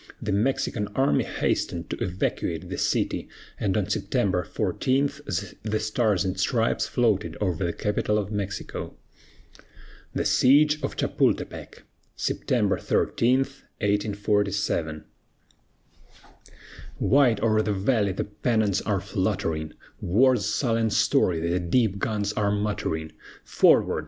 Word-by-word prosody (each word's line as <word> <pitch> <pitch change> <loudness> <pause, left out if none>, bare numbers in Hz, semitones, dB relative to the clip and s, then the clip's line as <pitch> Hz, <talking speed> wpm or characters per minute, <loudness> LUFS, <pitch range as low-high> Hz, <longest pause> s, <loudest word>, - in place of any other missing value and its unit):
The 105 - -3
Mexican 105 0 0
army 135 +1 +2
hastened 85 -2 -2
to - - -3
evacuate 90 +2 -2
the - - -4
city, - - -1 0.3
and - - 0
on - - 0
September - - 0
14 135 +2 0 0.5
the 110 0 -1
Stars 110 -3 +1
and 95 0 -2
Stripes 115 +4 +1
floated 110 -5 0
over 95 -3 -1
the 85 - 0
capital 105 +2 -1
of 105 -1 -2
Mexico. 100 -2 -4 1.2
THE - - -1
SIEGE 150 +3 +4
OF - - -3
CHAPULTEPEC - - -1 0.3
[September - - 0
13, 125 +3 +2
1847] 105 - -1 1.9
Wide 130 -6 +4
o'er 110 -1 +3
the 105 - -1
valley 100 +1 +1
the 95 - -2
pennons 105 -1 0
are 100 -3 -1
fluttering, 95 -5 -2 0.3
War's 115 +3 +3
sullen 115 -1 +1
story 90 -4 +2
the 85 +2 0
deep 100 +3 +1
guns 105 -1 -1
are 105 -1 0
muttering, 100 -6 -2 0.3
Forward! - - +3
105 Hz, 115 wpm, -25 LUFS, 95-115 Hz, 1.9 s, SIEGE